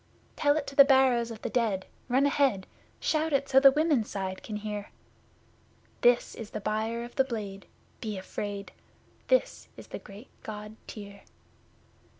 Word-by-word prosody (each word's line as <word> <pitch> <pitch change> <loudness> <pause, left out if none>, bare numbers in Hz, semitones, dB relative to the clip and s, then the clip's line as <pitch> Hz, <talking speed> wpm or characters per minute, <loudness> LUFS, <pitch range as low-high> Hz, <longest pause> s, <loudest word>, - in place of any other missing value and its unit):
Tell 290 0 +3
it 295 - -2
to 275 - -8
the 280 - +10
Barrows 265 -4 +4
of 225 -2 -9
the - - -2
Dead 215 -6 0 0.2
run 265 +3 +3
ahead! 275 -9 +2 0.3
Shout 315 0 0
it 275 0 +2
so 265 - +6
the 275 0 +9
Women's 295 -5 +2
Side 190 -1 -4
can 215 - -6
hear! 210 -1 -5 1.1
This 245 0 +4
is 220 -2 -8
the - - -5
Buyer 220 +3 -2
of 240 - -9
the 265 - +6
Blade 205 -6 -6 0.3
be 215 -3 -4
afraid! 200 +1 -5 0.6
This - - +1
is - - -10
the - - -6
great 205 +5 -13
God 210 0 -7
Tyr! 200 -2 -9
230 Hz, 160 wpm, -29 LUFS, 205-270 Hz, 1.1 s, the